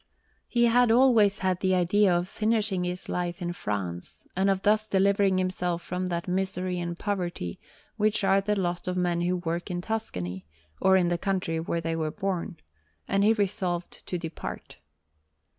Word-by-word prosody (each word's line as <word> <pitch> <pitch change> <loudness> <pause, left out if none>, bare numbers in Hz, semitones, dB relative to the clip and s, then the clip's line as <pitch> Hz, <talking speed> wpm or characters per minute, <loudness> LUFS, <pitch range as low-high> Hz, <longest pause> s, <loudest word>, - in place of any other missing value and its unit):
He 240 -1 +3
had 240 +1 +4
always 225 -5 +5
had 185 -2 0
the 185 -1 +2
idea 185 +3 +3
of 175 +1 -2
finishing 215 -3 0
his 180 +1 -3
life 175 0 -2
in 175 -1 -3
France, 95 - -4
and 190 +2 +2
of 195 -1 0
thus 215 +1 +3
delivering 195 -1 +3
himself 180 -2 -1
from 180 +1 -3
that 170 0 -3
misery 185 -1 -1
and 170 0 -4
poverty 175 - -3 0.4
which 215 0 +1
are 195 0 +4
the 205 +1 0
lot 175 -1 -2
of 180 0 -1
men 175 -1 +1
who 180 +1 +1
work 170 +1 -3
in 175 -1 -2
Tuscany, 95 - -4 0.3
or 190 0 +5
in 175 -2 +2
the 175 -1 0
country 185 -4 -1
where 165 +1 -2
they 165 0 -2
were 160 -1 -1
born; 185 +1 -3 0.5
and 195 0 +2
he 215 +2 +5
resolved 185 -4 -2
to 180 - -2
depart. 165 -1 -7
185 Hz, 175 wpm, -27 LUFS, 175-200 Hz, 0.5 s, always